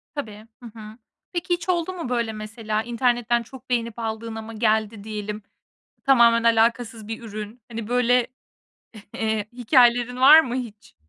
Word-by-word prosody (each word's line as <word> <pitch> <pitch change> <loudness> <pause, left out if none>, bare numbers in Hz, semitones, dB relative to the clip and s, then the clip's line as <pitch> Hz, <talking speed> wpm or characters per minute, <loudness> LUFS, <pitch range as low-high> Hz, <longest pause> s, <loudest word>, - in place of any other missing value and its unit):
Tabii, 215 -6 -7 0.2
hı - - -9
hı. 215 +1 -11 0.4
Peki, 350 +1 -1
hiç 345 0 -4
oldu 355 0 0
mu 335 -8 -6
böyle, 235 -3 -1
mesela? 215 0 -4
İnternetten 240 0 0
çok 260 +2 -14
beğenip 235 -2 -2
aldın 225 0 -4
ama 225 0 -8
geldi, 220 -1 0
diyelim. 210 -1 -6 0.6
Tamamen 235 -4 +5
alakasız 230 -1 +1
bir 225 +1 -6
ürün. 215 +1 -8
Hani, 225 -2 -6
böyle, 245 0 +2 0.9
eee, 220 -1 -2
hikâyelerin 245 0 +3
var 300 +5 +9
mı 250 -6 -4
hiç? 220 -5 -7
230 Hz, 145 wpm, -23 LUFS, 220-245 Hz, 0.9 s, var